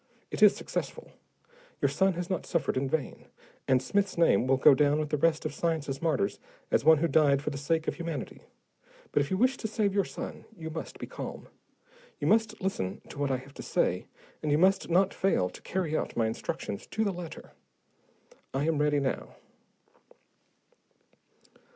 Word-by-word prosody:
It - - -4
is - - +8
successful. - - -5 0.7
Your - - +3
son 190 0 +2
has 175 0 -4
not 185 -3 -3
suffered 160 -6 0
in 130 +1 0
vain, 150 -1 -3 0.4
and 130 -1 +3
Smith's 200 +2 0
name 165 -6 +4
will 135 0 +4
go 130 - +7
down 145 +2 +3
with 155 -1 -2
the 150 - +1
rest 155 +1 +2
of - - -2
science's 155 -5 -2
martyrs 135 -12 0 0.3
as - - +3
one 160 +1 +7
who 170 +3 +1
died 145 -4 +4
for 150 - -2
the 140 - -5
sake 160 +3 0
of - - +1
humanity. 165 -5 -5 0.7
But - - +3
if 140 - -2
you 190 - 0
wish 255 +4 +3
to 220 - -3
save 210 -2 0
your 200 0 +3
son, - - -7
you 160 -1 -6
must 160 - -6
be - - -6
calm. - - -7 0.7
You - - -3
must 220 0 +2
listen 185 - -3
to 145 - -9
what 145 -1 0
I 130 - +1
have 135 +2 -13
to - - -9
say, - - 0 0.3
and 150 - -1
you 145 - +4
must 190 +3 +3
not 185 +3 +3
fail 90 - +1
to - - -12
carry 175 -4 -2
out - - -2
my 115 - +3
instructions 110 -2 -4
to 220 - -1
the 200 -3 0
letter. 175 -2 -8 1.0
I 140 +2 +1
am 160 -2 +1
ready 150 -1 +3
now." 135 -2 -3
160 Hz, 190 wpm, -29 LUFS, 140-185 Hz, 1.0 s, is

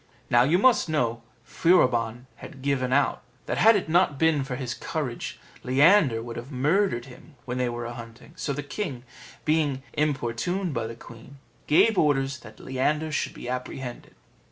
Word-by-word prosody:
Now 120 - +6
you 150 +8 +4
must 235 -4 +4
know 120 -6 0 0.2
Furibon 125 -8 +2
had 135 -6 -11
given 135 -2 0
out, 140 +2 +2 0.2
that - - -2
had 225 +1 +7
it 195 - -1
not 165 -3 +3
been 160 -2 +2
for 135 -1 -4
his 125 -2 -4
courage - - -4 0.2
Leander 135 - +4
would 120 0 -7
have 120 +4 -8
murdered 145 0 +1
him 130 +4 -15
when 125 0 -3
they 125 -1 +1
were 120 0 -5
a 120 - -5
hunting; 115 +5 -11
so 150 -3 -3
the 145 +1 -3
king, 140 - -5 0.4
being 150 -4 +1
importuned 150 +5 -1
by 115 -3 -2
the 115 - -7
queen, 115 +4 -13 0.3
gave 200 +7 +4
orders 135 -3 +1
that 110 -2 -14
Leander 150 +4 -1
should 155 - -2
be - - -8
apprehended. 125 0 -6
135 Hz, 170 wpm, -26 LUFS, 120-155 Hz, 0.4 s, had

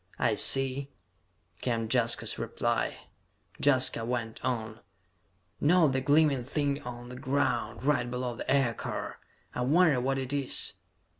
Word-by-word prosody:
"I - - +2
see," 135 +1 +1 0.7
came 115 -3 -1
Jaska's 120 0 +2
reply. - - -2 0.6
Jaska 130 -4 +4
went 115 -1 -4
on: 115 -3 -3 0.8
"Note 160 0 +4
the 130 0 0
gleaming 145 -2 +3
thing 140 +2 -1
on 120 0 -8
the 125 - -8
ground, 130 -2 -1
right 135 -4 +1
below 125 -1 -3
the - - -7
aircar? 135 -5 -1 0.3
I - - -3
wonder 150 0 +3
what 135 +2 0
it 130 +1 -4
is?" 140 -2 -1
130 Hz, 130 wpm, -29 LUFS, 120-140 Hz, 0.8 s, Jaska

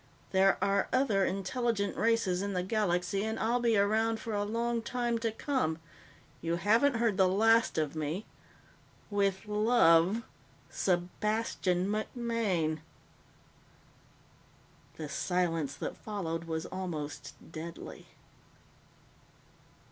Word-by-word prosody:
There 190 0 +4
are 200 0 +2
other 255 -7 +2
intelligent 200 +1 -1
races 225 -5 +1
in 200 0 -2
the 180 -1 0
galaxy, 195 -1 0
and 220 +1 -2
I'll 235 +3 +1
be 230 -3 +2
around 220 +3 +2
for 225 - -5
a 205 0 0
long 230 +2 -1
time 240 0 -1
to 225 -1 -1
come. 225 - -1 0.6
You 165 +1 0
haven't 225 +10 +3
heard 230 -4 +1
the 190 -2 +5
last 225 +4 +3
of 155 -1 -1
me. 155 +6 -3 0.9
With 200 -1 0
love 210 -2 +4 0.5
Sebastian 185 0 0
MacMaine." 215 -7 -1 2.2
The 155 - -6
silence 165 -2 -1
that - - -5
followed 170 -6 -4
was 160 0 -3
almost 170 -6 -5 0.2
deadly. 165 +1 -8
200 Hz, 110 wpm, -31 LUFS, 175-225 Hz, 2.2 s, the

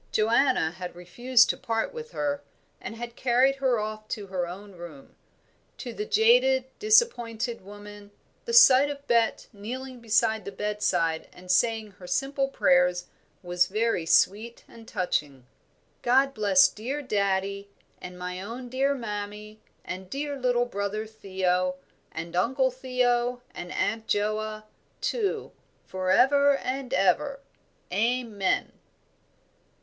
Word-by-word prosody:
Joanna 230 - +2
had 180 0 -8
refused 240 +8 +3
to - - -8
part 230 - -2
with 470 -1 -7
her, 285 - -2 0.4
and - - -7
had 235 0 -7
carried 260 +2 +2
her 260 -3 +1
off 215 0 -5
to 210 -2 -5
her 185 -2 -3
own 200 +4 -9
room. 170 -6 -12 0.6
To 245 -3 -7
the 210 - -4
jaded, 250 +4 +4
disappointed 240 - +2
woman, 205 +1 -12 0.4
the 470 - -4
sight 285 - +7
of 285 -1 -7
Bet 235 -3 +1
kneeling 250 +5 -7 0.2
by 220 -1 0
the 200 -1 -8
bedside 205 -7 -1
and 180 0 -6
saying 220 +2 +1
her 180 - -10
simple 275 +5 0
prayers 180 -7 +2 0.3
was 175 0 +1
very 215 -4 0
sweet 220 +7 +2
and 225 -1 -15
touching. 145 -7 -2 0.6
"God 270 +3 +3
bless 200 -5 +5
dear 265 +7 -5
daddie, 200 -3 -1 0.3
and 180 0 -9
my 180 0 -5
own 240 +5 -7
dear 270 +3 +1
mammie 210 -2 -6 0.3
and 185 0 -7
dear 285 +3 -3
little 245 -2 +1
brother 200 -1 -3
Theo, 185 -4 -1 0.4
and 165 +1 -6
Uncle 260 +8 +2
Theo 250 -1 0
and 175 0 -7
Aunt 225 +1 -1
Joa, 215 +1 -1 0.4
too, 430 -5 -2 0.3
for 185 0 -3
ever 280 +6 +5
and 260 -1 -4
ever. 195 +9 +1 0.5
Amen." 220 -3 0
220 Hz, 130 wpm, -27 LUFS, 190-255 Hz, 0.6 s, sight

